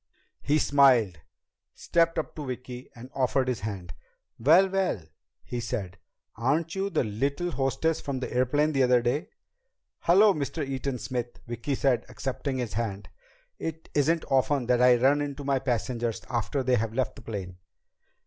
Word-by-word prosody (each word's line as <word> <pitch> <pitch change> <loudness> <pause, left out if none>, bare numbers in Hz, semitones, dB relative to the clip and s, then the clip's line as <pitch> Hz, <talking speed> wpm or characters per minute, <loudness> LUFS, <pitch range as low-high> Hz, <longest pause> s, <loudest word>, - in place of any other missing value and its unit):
He 150 +2 +2
smiled, 130 - +4 0.6
stepped 165 -1 +1
up 160 - -2
to 150 - -5
Vicki, 125 0 -7
and 125 +2 -11
offered 130 0 +1
his 125 -3 -1
hand. 95 -4 -6 0.5
"Well, 165 +11 +6
well," 190 - -1 0.4
he 120 - -4
said, 100 -7 -4 0.4
"aren't 150 +8 0
you 195 +1 -1
the - - +1
little 140 +11 -1
hostess 140 +3 0
from 140 -2 -3
the 130 - -5
airplane 145 +5 +2
the 135 -3 +1
other 125 -1 +4
day?" 130 +6 -1 0.7
"Hello, 200 +4 +5
Mr. 145 0 -3
Eaton 135 -1 -3
Smith," 120 -1 -4
Vicki 120 +4 -3
said, 130 -2 +1
accepting 135 0 -3
his 120 -5 -3
hand. 105 -2 -3 0.5
"It 160 0 -5
isn't 160 +3 +2
often 135 0 +2
that 125 0 +2
I 125 0 +7
run 135 +4 +3
into 145 0 -4
my 135 -1 +1
passengers 120 -3 -2
after 125 +3 -1
they 125 -1 +3
have 110 +1 -2
left 130 -3 -1
the - - -12
plane." 95 -5 -6
130 Hz, 160 wpm, -27 LUFS, 120-145 Hz, 0.7 s, I